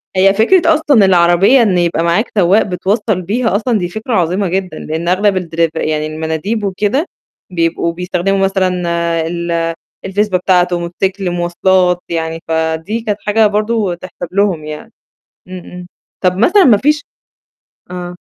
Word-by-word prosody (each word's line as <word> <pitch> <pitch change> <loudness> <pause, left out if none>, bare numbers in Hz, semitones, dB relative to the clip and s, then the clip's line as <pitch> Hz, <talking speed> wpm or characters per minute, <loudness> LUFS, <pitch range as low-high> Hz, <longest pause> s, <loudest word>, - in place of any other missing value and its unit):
هي 195 +1 +4
فكرة 325 - +3
أصلًا 295 -9 +3
العربية 185 +7 +4
إن 200 -6 +2
يبقى 170 -2 0
معاك 170 +7 0
سواق 195 +3 +4
بتوصّل 195 +1 -1
بيها 220 +4 -1
أصلًا 225 +2 0
دي 175 -3 -3
فكرة 220 +6 -5
عظيمة 185 +1 +1
جدًا، 185 +1 -3
لإن 160 +2 -4
أغلب 190 +2 +2
الدرف 165 -2 -1
يعني 155 -1 -1
المناديب 160 +8 -3
وكده، 205 - 0 0.5
بيبقوا 170 -1 -1
بيستخدموا 180 +2 -1
مثلًا 190 -1 +1 0.6
ال 170 -1 -2 0.3
الفزبة 195 -1 0
بتاعته، 180 -1 +2
موتوسيكل، 185 +2 -2
مواصلات، 180 +1 +1
يعني 165 -1 -3
فدي 160 +6 -1
كانت 210 -3 -3
حاجة 215 +1 +3
برضه 210 -2 0
تحسب 175 0 -9
لهم 190 -5 0
يعني، 155 +10 -8 0.6
إمم، 185 0 -7
إمم. 180 0 -11 0.4
طَب 180 0 +2
مثلًا 355 - +4
ما 240 -6 +6
فيش 295 +7 +1 0.9
آه. 180 -1 -5
185 Hz, 145 wpm, -14 LUFS, 170-210 Hz, 0.9 s, ما